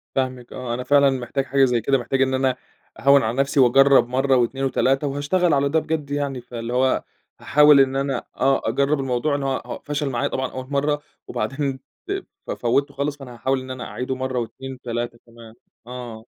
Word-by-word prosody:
فاهمِك، 130 -2 -2
آه، 125 -2 -4
أنا 125 +1 -3
فعلًا 140 0 +5
محتاج 135 +2 -2
حاجة 135 0 +3
زي 120 -2 +1
كده، 135 +4 +2
محتاج 135 +2 -1
إن 130 0 +2
أنا 130 -1 +1 0.4
أهوِّن 140 -1 +5
على 115 +4 -2
نفسي 140 +1 +1
وأجرب 135 0 +6
مرّة 130 +1 +2
و2 130 +2 0
و3 135 +2 +1
وهاشتغل 145 +5 +1
على 140 0 +2
ده 160 +2 +2
بجد 155 -2 -3
يعني، 140 -3 -2
فاللي 120 0 -6
هو 130 +1 +2 0.4
هاحاول 150 -1 +6
إن 135 0 +3
أنا 135 -2 -1
آه 135 0 +2
أجرب 140 +4 +1
الموضوع، 135 +2 0
إن 140 - -3
هو 135 -1 -3
فشل 145 -1 -2
معايا 120 -2 -1
طبعًا 130 -1 -3
أول 130 0 -7
مرة 145 +1 0 0.3
وبعدين 135 -1 -2 0.7
ف - - -3
فوّته 140 +4 0
خالص، 145 +1 -2
فأنا 130 -3 -10
هاحاول 130 +3 0
إن 130 0 -8
أنا 130 -1 -6
أعيده 130 +1 -4
مرّة 130 -1 -2
و2 130 +3 -6
و3 120 -1 -5
كمان، 115 -1 -14 0.3
آه. 120 -3 -8
135 Hz, 190 wpm, -22 LUFS, 125-140 Hz, 0.7 s, وأجرب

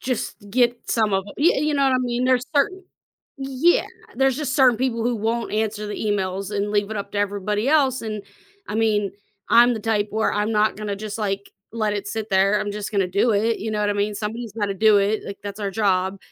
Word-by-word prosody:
Just 255 -3 -2 0.2
get 240 +1 +3
some 215 -3 +2
of 195 0 +2
it, - - -11
you 300 -2 +3
you 300 - 0
know 280 - +2
what 265 -1 +3
I - - +3
mean? 245 0 -1
There's 255 -1 +2
certain 375 +6 +1 0.6
Yeah, 270 +6 +2 0.3
there's 270 0 +2
just 290 -3 -2
certain 255 -4 +5
people 235 -2 -1
who 240 0 +1
won't 225 +2 -2
answer 215 -1 -1
the 205 - -4
emails 195 -1 -2
and 205 +1 -1
leave 205 0 +1
it 215 - -3
up 200 - -5
to 205 - -2
everybody 205 +3 -1
else, 275 -4 +3
and 215 -2 -4 0.5
I - - -4
mean, 210 -3 +1 0.4
I'm 240 +1 +6
the 220 - -5
type 210 -1 0
where 220 +1 0
I'm 210 +2 0
not 215 0 +2
gonna 210 -2 -4
just, 215 +1 -6
like, 200 -1 -3 0.2
let 215 -2 0
it 205 0 -4
sit 220 0 -4
there, 195 +2 +3
I'm 205 -1 -3
just 210 0 -5
gonna 195 -3 +2
do 200 +6 +2
it, 220 +3 +1
you 220 - -3
know 210 -1 -1
what 205 0 +1
I - - -1
mean? 205 +1 -1
Somebody's 220 +1 -5
gotta 205 -3 -1
do 215 +1 +5
it, 205 +2 +1
like, 200 - -7
that's 205 +1 -7
our 200 - -2
job, 190 -1 0
215 Hz, 235 wpm, -22 LUFS, 205-240 Hz, 0.6 s, I'm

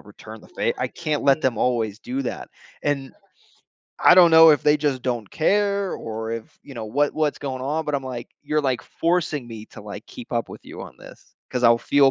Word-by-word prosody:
return - - -12
the - - -17
favor, 475 -1 -2
I - - +1
can't 155 -3 -3
let 140 +1 +4
them 125 -5 0
always 115 -4 0
do 130 +4 -4
that", 125 - -5 0.3
and 140 -2 -2 0.9
I 175 - +7
don't 175 -2 +7
know 160 0 +9
if 150 - +3
they 150 0 +5
just 145 -3 -1
don't 120 -5 -3
care 200 +2 +1
or 110 0 -5
if 115 -1 -8
you 140 - -11
know, 115 -2 -6
what 145 +7 0
what's 155 -2 0
going 130 -2 -5
on, 150 +4 -1
but 150 - -2
I'm 140 - -1
like, 125 -2 -6
"You're, 150 +1 0
like, 130 -3 0
forcing 165 -6 -1
me 110 -2 -9
to, - - -12
like, - - -9
keep - - -11
up - - -1
with - - -11
you - - -9
on - - -11
this - - -16
'cause 125 -1 -2
I'll 115 0 +6
feel 140 +2 +4
140 Hz, 225 wpm, -23 LUFS, 120-155 Hz, 0.9 s, know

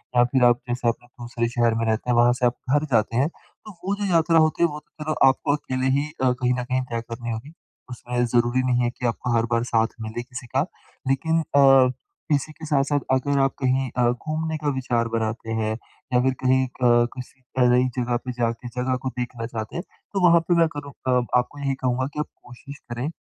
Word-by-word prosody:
या 120 - +6
फ़िर 125 +1 +1
आप 120 0 +5
जैसे 120 0 -1
अपने 120 +1 -5
दूसरे 120 -1 -4
शहर 120 -1 +2
में 115 0 0
रहते 110 +2 -1
हैं 120 - +3
वहाँ 120 +1 +5
से 125 - +2
आप 120 0 +2 0.2
घर 145 +1 +3
जाते 110 0 +2
हैं 135 - +3
तो 215 - -17
वो 200 +2 0
जो 205 0 -3
यात्रा 165 0 +4
होती 155 +1 +3
है 170 - +6
वो 150 0 -6
तो 150 - -12
चलो 155 0 -1
आपको 135 +2 +2
अकेले 130 -2 -2
ही 145 - -1 0.2
अ, 125 - +4
कहीं 125 0 0
न 125 0 -2
कहीं 130 +1 -1
तय 115 0 -1
करनी 115 0 -5
होगी। 120 +8 -6 0.4
उसमें 125 0 -2
ज़रूरी 120 +1 +2
नहीं 125 -1 +2
है 120 - +2
कि 125 0 -7
आपको 120 +1 -1
हर 115 0 +2
बार 115 0 +2
साथ 115 -1 +3
मिले 110 +2 -4
किसी 125 -1 -9
का। - - 0 0.4
लेकिन 160 +5 +1 0.2
अ, 135 -2 +7 0.5
इसी 140 +3 -3
के 155 +1 -10
साथ-साथ 145 -1 +1
अगर 140 +2 +2
आप 135 0 +2
कहीं 130 0 +1
अ, 120 -1 +4
घूमने 155 +5 -3
का 150 -1 -4
विचार 120 -3 0
बनाते 115 0 -2
हैं 110 -1 0 0.4
या 125 - +5
फ़िर 130 0 +2
कहीं 130 +1 +3
अ, 120 -1 +3
किसी 130 +1 -10 0.3
नई 125 +1 +4
ज़गह 120 -1 0
पे 125 - -3
जा 120 -1 0
के 115 +1 -9
ज़गह 125 +1 -1
को - - +1
देखना 120 -2 -4
चाहते 110 -2 -6
हैं 175 - -3 0.3
तो 190 -3 +4
वहाँ 170 0 +6
पे 175 - +3
मैं 165 - +5
करूँ 145 -1 -6 0.2
अ 125 -1 +3 0.2
आपको 145 +4 -2
यही 135 -1 0
कहूँगा 130 +1 +1
कि 150 - -5
आप 150 - -1 0.2
कोशिश 130 +3 -11
करें। 125 +7 -3
125 Hz, 230 wpm, -24 LUFS, 120-140 Hz, 0.5 s, अ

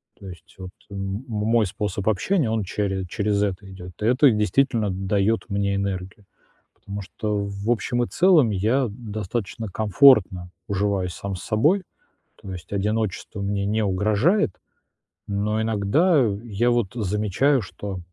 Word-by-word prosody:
То 100 - -12
есть 90 - -13
вот 95 -1 -8 0.2
м 95 0 -4
м 125 - -10
мой 110 0 +1
способ 105 0 -4
общения, 140 - +1
он 110 -2 0
чере 95 0 -2
через 100 +1 0
это 100 0 -3
идёт. 90 -1 -10
И - - -1
это 125 +3 +5
действительно 110 0 +1
даёт 100 +3 0
мне 100 0 0
энергию, 100 0 -4 0.5
потому 100 0 -7
что 105 +2 -3
в 100 +2 -4
общем 120 +1 +1
и - - -2
целом 170 -10 +4
я 115 +7 +1
достаточно 110 0 -5
комфортно 100 -3 +4 0.2
уживаюсь 100 -3 -1
сам 100 -1 -5
с 90 - -8
собой. 155 - +2 0.5
То 95 - -10
есть 90 -1 -9
одиночество 105 0 -2
мне 100 0 -1
не 110 +1 0
угрожает. 105 - +2 0.8
Но 105 +2 -1
иногда, 115 - +2
э, 105 -6 +1
я 120 +2 0
вот 120 -5 0
замечаю, 110 +6 +1
что, 95 +1 -7
105 Hz, 150 wpm, -23 LUFS, 100-115 Hz, 0.8 s, это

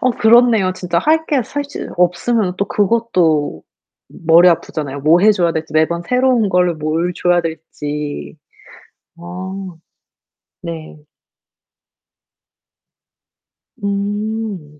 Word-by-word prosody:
어 255 - +2
그렇네요. 225 -4 +4
진짜 175 -2 -2
할 320 - +2
게 275 -5 +1
사실 285 +4 -6
없으면 180 +3 +1
또 200 - 0
그것도 180 - 0 0.6
머리 170 +2 +7
아프잖아요. 150 -4 -2
뭐 160 +5 +4
해줘야 190 -5 +3
될지 160 0 -5
매번 160 +2 +1
새로운 250 -1 +2
걸 180 -2 +2
뭘 160 +3 -1
줘야 175 0 +2
될지. 150 - -6 0.8
아 - - -16 1.4
네. 165 -3 -7 2.9
음. 200 -5 -4
180 Hz, 185 characters per minute, -17 LUFS, 160-220 Hz, 2.9 s, 머리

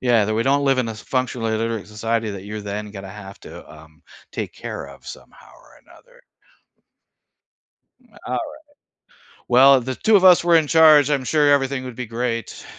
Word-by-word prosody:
Yeah, 120 -4 +2
that 110 +1 -2
we 115 - 0
don't 140 +1 +1
live 135 -2 +2
in 125 - 0
a - - -4
s 105 - -12
functionally 125 -3 -2
illiterate 115 -1 -3
society 110 +1 -3
that 100 -1 -8
you're 105 +1 -7
then 105 +1 -6
gonna 95 -2 -9
have 100 -1 -12
to, - - -13
um, 80 0 -18 0.3
take - - -6
care - - -7
of - - -15
somehow - - -13
or - - -21
another. - - -22 1.8
M - - -28 0.2
alright. - - -2 1.1
Well, 130 +1 +5
the 130 +2 -5
2 220 - +2
of 190 - +4
us 180 -2 +6
were 170 -1 +3
in 160 -2 +3
charge, 155 -3 +5
I'm 140 -3 0
sure 150 +1 +2
everything 135 -2 0
would 125 -2 -8
be 125 - -6
great. 115 0 -5
120 Hz, 190 wpm, -20 LUFS, 105-140 Hz, 1.8 s, us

